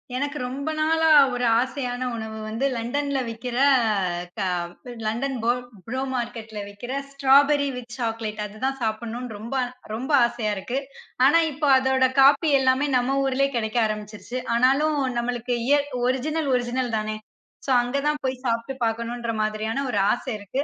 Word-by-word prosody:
எனக்கு 285 +3 -2
ரொம்ப 280 +4 -4
நாளா 320 +1 +3 0.2
ஒரு 245 0 -1
ஆசையான 255 -1 -2
உணவு 220 -1 -6
வந்து 225 +5 -2
Londonல 275 +4 -1
விக்குற 235 +2 -5
அ, 200 -9 +2
க - - -2 0.6
London 240 +6 -1
பொ 235 - +4 0.3
ப்ரோ 260 +3 -3
மார்கெட்ல 230 -3 -4
விக்கிற 205 +5 -8 0.2
ஸ்ராபரி 280 +1 +4
வித் 245 -1 -8
சாக்லேட் 225 -3 -3
அது 210 +1 -10
தான் 270 0 -1
சாப்பிடணும்னு 230 +2 -3
ரொம்ப 230 +5 -7 0.4
ரொம்ப 255 +7 -4
ஆசயா 235 -3 -2
இருக்கு. 240 +8 -3 0.5
ஆனா 295 +5 +6
இப்போ 295 +1 -2
அதோட 260 0 +3
காபி 280 +4 +6
எல்லாமே 260 +2 +2
நம்ம 250 +2 0
ஊர்லயே 270 +1 +1
கெடைக்க 220 0 0
ஆரம்பிச்சுடுச்சு. 215 +3 -5 0.2
ஆனாலும் 275 +5 +3 0.2
நம்மளுக்கு 245 0 -2
இயற் 290 0 +3 0.2
ஒரிஜினல் 290 +4 -1
ஒரிஜினல் 245 -1 -1
தானே. 215 0 -3 0.5
சோ - - +1
அங்க 245 +3 -2
தான் 300 0 0
போய் 260 -1 -2
சாப்ட்டு 230 +3 -1
பாக்கணும்ன்ற 235 +1 -2
மாதிரியான 215 +5 -1
ஒரு 205 - +1
ஆசை 245 +1 -2
இருக்கு. 205 +8 -3
245 Hz, 150 wpm, -24 LUFS, 225-270 Hz, 0.6 s, ஆனா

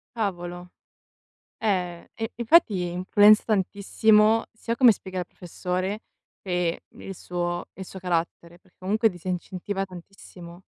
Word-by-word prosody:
Cavolo, 175 -4 -4 0.9
eh, 180 -5 -2
e 225 0 -4
infatti 230 - +3
influenza 205 +4 +5
tantissimo, 210 +2 +3
sia 230 +1 -4
come 245 -2 +7
spiega 185 -2 -7
il 180 - -3
professore, 185 +4 -4 0.4
che 180 -3 -1
il 195 - -10
suo 175 0 -3
il 190 - -8
suo 190 - -10
carattere, 170 -1 -3
perché 185 - -30
comunque 215 +4 +2
disincentiva 185 +2 -4
tantissimo. 180 -1 -13
185 Hz, 115 wpm, -25 LUFS, 175-210 Hz, 0.9 s, come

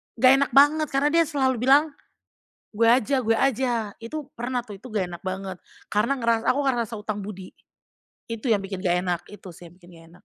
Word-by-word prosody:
enggak 255 +2 +5
enak 280 - 0
banget 300 +2 +5
karena 275 +2 +1
dia 335 0 +4
selalu 265 -4 0
bilang, 295 +3 +5 0.9
"Gue 230 - +3
aja 260 +1 +1
gue 225 - +3
aja," 240 -4 0
itu 295 +3 -6
pernah 245 +1 -2
tuh, 210 -4 -10
itu 200 - -23
gak 190 -4 -1
enak - - -28
banget. 190 0 -4 0.3
Karena 215 +6 +1
ngeras 230 0 +1
aku 275 - +2
ngerasa 240 -5 -1
hutang 210 0 -4
budi. 195 -2 -8 0.8
Itu 230 +1 -1
yang 205 - +2
bikin 195 0 -7
gak 175 0 +2
enak, 180 -2 -2
itu 205 -2 -12
sih 175 0 -12
yang - - -21
bikin 175 - -18
gak 165 - -16
enak. 180 - -20
230 Hz, 205 wpm, -24 LUFS, 195-270 Hz, 0.9 s, enggak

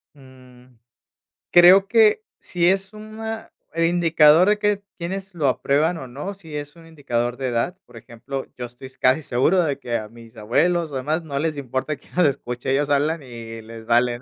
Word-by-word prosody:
Mm, 130 -2 -18 0.8
creo 185 +3 +7
que 225 - +4 0.2
si 175 -1 0
es 195 +2 +1
una 220 +1 -7 0.2
el 165 0 +1
indicador 165 -1 +5
de 210 0 +3
que 210 -1 0
quiénes 190 +2 -5
lo 150 -4 0
aprueban 150 +6 +1
o 135 - -8
no, 145 +11 -6
si 165 -6 -11
es 145 +2 -7
un 165 -1 -15
indicador 120 -6 -2
de 130 0 -3
edad, 120 +10 -1
por - - -15
ejemplo, 130 +4 -7
yo 125 - -5
estoy 125 +2 -12
casi 130 +3 +2
seguro 155 +6 +2
de 140 -3 -2
que 120 -3 -2
a 110 -1 -6
mis 115 +1 -16
abuelos 165 +10 +1
o - - -6
demás 155 +6 -1
no 140 -3 -5
les 155 0 -2
importa 135 +2 -3
quién - - -24
nos 180 -1 +4
escuche 125 -3 -2
ellos 145 +2 +1
hablan 150 +3 +1
y 115 -3 -9
les 115 0 -11
vale, 120 +1 +2
¿no?, - - -19
145 Hz, 195 wpm, -22 LUFS, 125-175 Hz, 0.8 s, creo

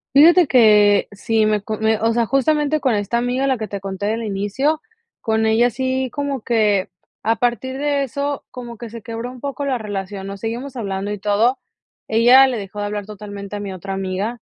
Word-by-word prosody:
Fíjate 335 +4 +7
que, 210 -5 +5
sí, 215 +2 0
me 215 -1 +1
co 215 +2 -4
me 220 0 +1
o 225 +1 +1
sea, 235 0 +2
justamente 295 +4 +1
con 260 -6 +1
esta 205 +3 -1
amiga, 250 +3 0
la 265 -3 +1
que 215 - -3
te 200 - -5
conté 195 +1 -4
del 225 +2 -1
inicio, 215 +10 -1 0.4
con 220 0 +1
ella 225 +2 +4
sí 260 +1 -1
como 285 -3 -3
que, 210 -4 +1 0.3
a 225 +2 +1
partir 245 +3 -1
de 285 0 0
eso, 280 +2 -3
como 240 -2 -9
que 235 - -7
se 230 0 -9
quebró 230 +2 -5
un 250 0 -11
poco 280 +2 -4
la 265 -2 0
relación, 200 -3 -5
nos 195 0 -7
seguimos 240 +5 -5
hablando 200 -3 -3
y 210 - -4
todo. 210 +6 +2 0.5
Ella 245 +4 +6
le 255 -2 -2
dejó 200 0 -7
de 205 - -1
hablar 205 -1 -4
totalmente 205 -1 -8
a - - -5
mi 200 -1 -5
otra 190 +1 -6
amiga, 195 +5 -3
225 Hz, 205 wpm, -20 LUFS, 205-260 Hz, 0.5 s, Fíjate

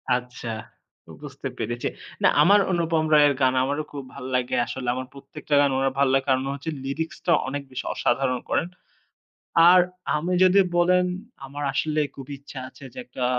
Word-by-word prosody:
আচ্ছা, 125 -1 -6 0.6
তো - - -21
বুঝতে - - -7
পেরেছে 120 +2 -3 0.4
না, - - +7
আমার 200 +7 +6
অনুপম 165 -2 +1
রয়ের 145 -1 +6
গান 130 -1 +4
আমারও 145 +3 -1
খুব 140 -1 -6
ভাল - - -9
লাগে 125 -1 0
আসলে। 130 0 -6
আমার 130 0 -5
প্রত্যেকটা 145 +2 -4
গান 140 - +3
ওনার 135 0 +1
ভাল 140 0 +4
লাগে 135 0 +2
কারণ 130 0 +2
হচ্ছে 140 +3 -6
lyrics 150 +4 -4
টা 175 - +2 0.2
অনেক 140 +2 -3
বেশি 130 - -5
অসাধারণ 125 0 0
করেন। 165 - +1 1.0
আর 180 0 +7 0.4
আমি 170 +4 -2
যদি 185 +2 +5 0.2
বলেন, 180 +1 +4 0.4
আমার 145 +2 -7
আসলেই 150 0 0
খুব 135 - -9
ইচ্ছা 140 0 -10
আছে 135 - -15
যে - - -12
একটা, 125 +1 -5
140 Hz, 175 wpm, -24 LUFS, 130-155 Hz, 1.0 s, না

